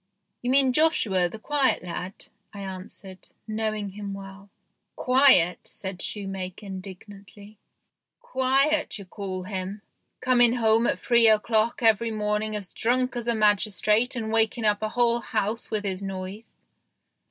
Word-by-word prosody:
" - - -53
You 245 - -3
mean 265 -1 +4
Joshua, 220 - +2
the 220 - -8
quiet 265 -2 +1
lad," 180 +2 -6 0.3
I 200 - -7
answered, 190 0 -9 0.2
knowing 215 -1 -2
him 200 0 -7
well. 195 0 -11 0.2
" - - -54
Quiet! 255 -10 +5
" - - -48
said 190 -2 -6
shoemaker 195 -1 -5
indignantly. 200 +2 -11 0.3
" - - -63
Quiet 270 +3 +1
you 200 - -10
call 185 -1 -6
him, 190 +2 -5 0.4
coming 245 -2 +4
home 225 -1 +3
at - - 0
three 235 -2 +4
o'clock 220 +2 +2
every 225 0 +3
morning 210 0 -1
as 200 -3 -5
drunk 250 +2 0
as 240 -1 -4
a 235 - +1
magis 210 -1 +2
trate 225 +5 +2
and 220 -2 -3
waking 225 0 +1
up 205 -1 +2
the 215 - -2
whole 235 0 +2
house 220 0 -3
with 215 -2 -2
his 190 -1 -3
noise." 195 +2 -7
215 Hz, 155 wpm, -25 LUFS, 195-235 Hz, 0.4 s, Quiet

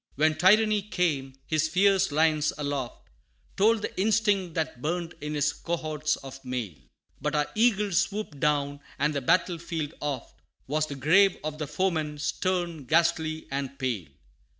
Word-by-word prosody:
II. - - -47
When 155 +2 +3
Tyranny 210 +4 +4
came, 160 -9 -1
his 155 -1 +1
fierce 195 +2 +3
lions 155 0 +2
aloft 145 -4 -4 0.5
Told 215 +2 +3
the - - -4
instinct 205 -4 +2
that 155 -6 -2
burned 170 +3 -2
in 150 0 -4
his 145 0 +1
cohorts 155 -3 -2
of 135 0 -11
mail 125 -7 -3 0.5
But - - -1
our 150 0 +2
eagles 210 -4 +3
swooped 200 -8 -3
down, 145 -1 +1 0.2
and 150 +2 +1
the 140 - -1
battle 170 +5 +2
field 165 -2 -4
oft, 140 -5 -5 0.2
Was 155 +3 0
the 140 - -6
grave 180 +8 +4
of 155 0 -4
the 150 - -3
foeman, 155 -3 -1
stern, 170 +1 -2
ghastly 160 +1 +1
and 140 0 -3
pale. 115 - -2
155 Hz, 155 wpm, -27 LUFS, 145-180 Hz, 0.5 s, Tyranny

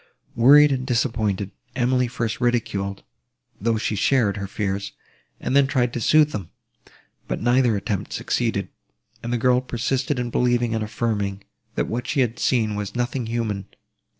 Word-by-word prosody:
Wearied 145 +5 +7
and 130 -1 -2
disappointed, 110 -6 0 0.2
Emily 125 0 +2
first 115 -1 -3
ridiculed, 100 -5 -1 0.6
though 115 +2 +1
she 110 0 -1
shared, 110 -3 +2
her 100 -1 -4
fears, 100 0 -3 0.5
and - - -2
then 140 -1 +5
tried 125 -3 +1
to 120 - -3
sooth 150 +4 +4
them; 100 -6 -5 0.8
but - - -2
neither 120 -1 +3
attempt 100 0 -3
succeeded, - - -1 0.5
and 120 - -4
the 120 - +1
girl 125 +1 +3
persisted 130 +2 -1
in 120 -1 -2
believing 120 -1 +1
and 110 -1 -1
affirming, 105 -3 -2 0.3
that - - 0
what 120 +2 -4
she 140 - +1
had 120 -2 -1
seen 110 -4 +1
was 105 +1 -4
nothing 120 0 -2
human. 110 -4 -2
120 Hz, 155 wpm, -23 LUFS, 105-125 Hz, 0.8 s, Wearied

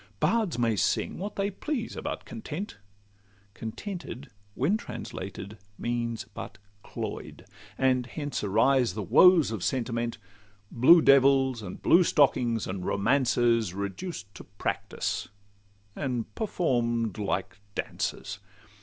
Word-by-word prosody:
Bards 220 - +1
may 115 -2 +2
sing 100 - 0
what 200 +3 -5
they 200 +1 0
please 240 +3 -4
about - - -5
Content; 185 - -6 0.7
Contented, 140 - -7 0.2
when 150 +11 +2
translated, 105 - -7 0.2
means 120 -1 -2
but 100 - -7 0.3
cloy'd; - - -6 0.3
And 130 -2 +2
hence 145 -2 -4
arise 115 +1 +3
the 105 - -3
woes 175 - +6
of 105 -5 -4
sentiment, 115 -2 -1 0.5
Blue 160 +8 +7
devils, 135 -2 +5
and 105 - -8
blue 175 +2 +6
stockings, 125 -8 +2
and 95 -1 -4
romances 115 -2 +2
Reduced 100 - -5
to - - -10
practice, 100 +2 -3 0.7
and 125 -5 -3
perform'd 120 - 0
like 95 -2 -2 0.2
dances. - - -3
120 Hz, 110 wpm, -28 LUFS, 110-150 Hz, 0.7 s, Blue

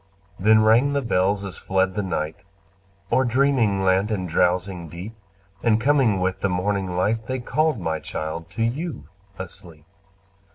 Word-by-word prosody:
Then 110 +3 +5
rang 120 +6 +4
the 140 -1 0
bells 100 -2 +1
as 95 -2 -7
fled 95 0 0
the 105 - -1
night 80 -4 -3 0.7
O'er 130 +3 +4
dreaming 120 -6 +2
land 95 +2 +2
and 95 -4 -2
drowsing 90 0 0
deep, 90 +8 -8 0.5
And 115 -2 +3
coming 125 -6 +3
with 95 +1 -1
the 100 - +1
morning 95 0 -1
light, 110 +4 0
They 130 - -2
called, 150 +2 0
my 80 -3 -2
child, 80 +2 -5
to 115 - -1
you 130 - -3 0.3
asleep. 85 -4 -10
100 Hz, 155 wpm, -23 LUFS, 90-115 Hz, 0.7 s, Then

